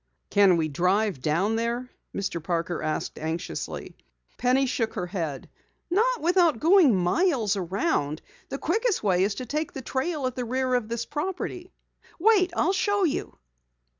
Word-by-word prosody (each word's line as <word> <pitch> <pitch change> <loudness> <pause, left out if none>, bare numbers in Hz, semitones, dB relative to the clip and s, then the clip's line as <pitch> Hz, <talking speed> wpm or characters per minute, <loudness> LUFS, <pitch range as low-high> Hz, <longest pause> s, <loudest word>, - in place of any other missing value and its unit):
"Can 195 -3 +5
we 160 -1 +1
drive 180 +2 +1
down 180 +10 +1
there?" 235 +2 -2 0.2
Mr. 180 -5 -3
Parker 170 0 -2
asked 155 0 -3
anxiously. 160 +3 -4 0.4
Penny 255 +2 +3
shook 240 -3 -1
her 180 - -2
head. 165 -7 -4 0.4
"Not 470 +6 +2
without 340 -6 +3
going 330 - +5
miles 220 - +2
around. 180 - -1 0.3
The - - -3
quickest 450 - 0
way 185 -3 +3
is 200 +1 0
to 255 - -5
take 300 +5 -3
the 265 - -6
trail 275 +3 -2
at 255 -1 -2
the 250 - -2
rear 255 +2 -1
of 245 -3 0
this 235 0 -2
property. 360 +4 -4 0.5
Wait, 380 -1 +4
I'll 365 +5 +2
show 405 +1 +1
you!" 325 - -1
240 Hz, 155 wpm, -26 LUFS, -, 0.5 s, Can